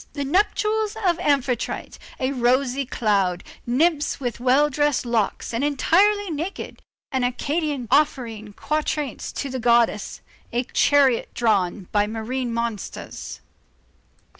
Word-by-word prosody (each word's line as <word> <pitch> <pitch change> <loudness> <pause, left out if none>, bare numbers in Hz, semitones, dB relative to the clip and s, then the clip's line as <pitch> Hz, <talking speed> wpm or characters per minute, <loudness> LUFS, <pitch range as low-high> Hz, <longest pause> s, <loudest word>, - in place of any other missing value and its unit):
The 285 -2 -3
nuptials 425 +6 +1
of 345 -2 +2
Amphitrite, 265 -4 -1 0.2
a 260 0 0
rosy 255 +1 +1
cloud, 195 -7 +1 0.2
nymphs 300 +5 +1
with 245 -4 -3
well 260 +4 +4
dressed 295 -2 0
locks 235 -1 -1
and 230 +4 -1
entirely 380 +8 +3
naked, 325 +6 -5 0.3
an 260 -2 0
Academician 285 +1 -1
offering 235 -8 +1
quatrains 300 -1 -2
to 275 - -4
the 260 - -3
goddess, 235 -3 +2 0.3
a 240 +1 0
chariot 270 -1 +3
drawn 200 -5 +1
by 205 0 +2
marine 235 +3 -3
monsters. 230 -3 -5
260 Hz, 115 wpm, -23 LUFS, 235-295 Hz, 0.3 s, well